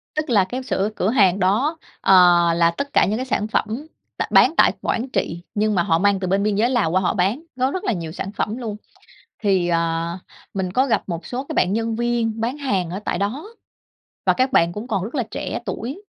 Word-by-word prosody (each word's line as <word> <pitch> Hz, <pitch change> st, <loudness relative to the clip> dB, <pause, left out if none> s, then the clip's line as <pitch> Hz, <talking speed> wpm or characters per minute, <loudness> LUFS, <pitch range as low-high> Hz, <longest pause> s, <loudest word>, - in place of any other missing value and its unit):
Tức 305 Hz, -1 st, -2 dB
là 210 Hz, -5 st, +4 dB
cái 250 Hz, +8 st, -5 dB
sửa 205 Hz, -5 st, -1 dB
cửa 185 Hz, -, 0 dB
hàng 200 Hz, -6 st, +3 dB
đó, 225 Hz, -, +1 dB, 0.2 s
ờ, 195 Hz, -, +4 dB, 0.4 s
là 170 Hz, 0 st, +3 dB
tất 280 Hz, +11 st, -5 dB
cả -, -, +5 dB
những 210 Hz, +3 st, -1 dB
cái 255 Hz, -, -3 dB
sản 215 Hz, -5 st, -1 dB
phẩm 225 Hz, +7 st, -2 dB, 0.3 s
tại -, -, -1 dB
b -, -, -9 dB
bán -, -, +6 dB
tại -, -, +5 dB
Quảng 250 Hz, +4 st, -2 dB
Trị, 170 Hz, -8 st, -2 dB
nhưng 215 Hz, 0 st, +1 dB
mà 175 Hz, -, +2 dB
họ 165 Hz, -1 st, +2 dB
mang 200 Hz, +1 st, +2 dB
từ 185 Hz, -, -3 dB
bên 195 Hz, +2 st, +1 dB
biên 210 Hz, -1 st, +1 dB
giới 225 Hz, +4 st, +2 dB
Lào 235 Hz, -11 st, +1 dB
qua 185 Hz, +2 st, +2 dB
họ 180 Hz, -, +1 dB
bán, 200 Hz, +8 st, 0 dB, 0.2 s
có 260 Hz, +2 st, +2 dB
rất 375 Hz, -, -4 dB
là -, -, 0 dB
nhiều 165 Hz, -4 st, -5 dB
sản 190 Hz, +4 st, -5 dB
phẩm 210 Hz, +2 st, -3 dB
luôn. 225 Hz, -5 st, -5 dB, 0.7 s
Thì, 190 Hz, -4 st, +2 dB
ờ, 165 Hz, 0 st, -1 dB, 0.4 s
mình 190 Hz, -2 st, -2 dB
có 260 Hz, +8 st, +2 dB
gặp 255 Hz, -, +1 dB
một 170 Hz, -2 st, -5 dB
số 250 Hz, +2 st, -4 dB
cái -, -, -3 dB
bạn 185 Hz, -, +2 dB
nhân 225 Hz, +1 st, -1 dB
viên 230 Hz, -1 st, -1 dB
bán 245 Hz, +5 st, -2 dB
hàng 200 Hz, -, -1 dB
ở 185 Hz, +3 st, -4 dB
tại -, -, -1 dB
đó, 250 Hz, -, -3 dB, 0.8 s
và -, -, +4 dB
các 260 Hz, +1 st, +1 dB
bạn 170 Hz, -8 st, +3 dB
cũng 210 Hz, +5 st, -6 dB
còn 195 Hz, -6 st, -1 dB
rất 225 Hz, +8 st, -6 dB
là 255 Hz, -, +1 dB
trẻ -, -, -4 dB
tuổi. 240 Hz, -, -5 dB
210 Hz, 240 wpm, -21 LUFS, 185-245 Hz, 0.8 s, bán